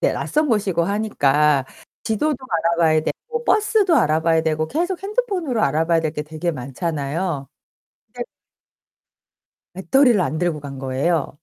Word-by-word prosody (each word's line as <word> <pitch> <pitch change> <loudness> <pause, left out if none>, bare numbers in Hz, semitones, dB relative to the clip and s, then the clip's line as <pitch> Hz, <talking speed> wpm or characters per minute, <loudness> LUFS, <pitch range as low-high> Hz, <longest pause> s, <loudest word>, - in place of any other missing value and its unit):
네 - - +2
낯선 300 0 0
곳이고 195 -7 +1
하니까 150 -9 +2 0.4
지도도 270 +7 0
알아봐야 165 -1 +2
되고 470 - -5
버스도 420 -4 +3
알아봐야 160 - +2
되고 155 0 0
계속 350 +5 -2
핸드폰으로 390 - -1
알아봐야 165 +3 +2
될 160 -1 -2
게 150 - -4
되게 155 +3 -3
많잖아요. 145 +2 -3 0.6
근데 - - -5 1.5
배터리를 230 +5 +3
안 155 -2 -1
들고 170 -3 -1
간 140 -2 -8
거예요. 140 +3 -1
170 Hz, 310 characters per minute, -21 LUFS, 150-245 Hz, 1.5 s, 버스도